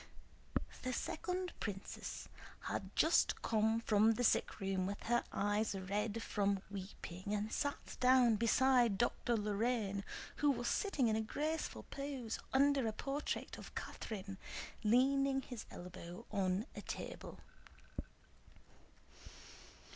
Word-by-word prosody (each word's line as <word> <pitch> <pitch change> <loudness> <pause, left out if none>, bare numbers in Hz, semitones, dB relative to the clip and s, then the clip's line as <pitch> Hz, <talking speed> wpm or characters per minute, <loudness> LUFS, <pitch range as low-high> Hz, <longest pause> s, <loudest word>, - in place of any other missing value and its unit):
The 255 0 -2
second 360 +6 -2
princess 195 -2 -5 0.3
had - - -3
just - - +4
come 220 0 +3
from 220 0 +5
the 245 - -1
sickroom 195 -4 +2
with 200 +1 -4
her 240 +1 +2
eyes 205 +1 +1
red 205 +4 -1
from 200 -2 +1
weeping 190 0 -5
and 210 +1 -2
sat 285 -1 -2
down 250 -2 +6
beside 240 -1 +4
Dr. 240 +1 +1
Lorrain, 210 -1 0 0.3
who 295 - +4
was 240 -3 +1
sitting 295 - +2
in 220 - +3
a 220 - +1
graceful 305 +8 -2
pose 275 -5 -3
under 275 -2 +4
a 220 - -1
portrait 275 +6 -3
of - - -10
Catherine, 195 -2 -5 0.4
leaning 270 +4 +4
his 245 -4 -7
elbow 180 +3 -8
on 195 0 +1
a - - -5
table. - - -6
225 Hz, 115 wpm, -37 LUFS, 200-260 Hz, 0.4 s, down